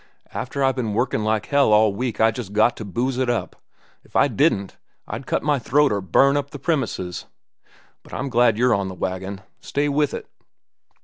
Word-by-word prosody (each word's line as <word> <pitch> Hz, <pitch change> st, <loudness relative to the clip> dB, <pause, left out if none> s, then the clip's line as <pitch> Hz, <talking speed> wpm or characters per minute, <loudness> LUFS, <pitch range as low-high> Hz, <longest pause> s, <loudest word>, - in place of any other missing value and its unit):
"After 135 Hz, +2 st, -3 dB
I've 135 Hz, -1 st, +2 dB
ben 110 Hz, -5 st, -2 dB
workin' 120 Hz, -2 st, 0 dB
like 110 Hz, 0 st, 0 dB
hell 140 Hz, -5 st, +3 dB
all 105 Hz, -1 st, +5 dB
week 125 Hz, +3 st, -3 dB
I 110 Hz, 0 st, +5 dB
just 110 Hz, -4 st, -7 dB
got 110 Hz, +3 st, +3 dB
to -, -, -6 dB
booze 125 Hz, +6 st, -2 dB
up. 120 Hz, -2 st, -1 dB, 0.5 s
If -, -, -25 dB
I -, -, +5 dB
didn't, 100 Hz, 0 st, +1 dB, 0.3 s
I'd -, -, -6 dB
cut -, -, 0 dB
my 145 Hz, -1 st, +2 dB
throat 145 Hz, +5 st, +2 dB
or 100 Hz, -1 st, 0 dB
burn 135 Hz, -, +3 dB
up 140 Hz, 0 st, -2 dB
the -, -, -8 dB
premises. 115 Hz, -, -2 dB, 0.7 s
But -, -, -18 dB
I'm 135 Hz, +1 st, -3 dB
glad 120 Hz, -3 st, +3 dB
you're 125 Hz, +1 st, +3 dB
on 100 Hz, -2 st, 0 dB
the 95 Hz, -, -7 dB
wagon. 95 Hz, +2 st, -4 dB, 0.2 s
Stay 145 Hz, +1 st, -1 dB
with 145 Hz, 0 st, +1 dB
it." -, -, -6 dB
120 Hz, 195 wpm, -22 LUFS, 105-135 Hz, 0.7 s, all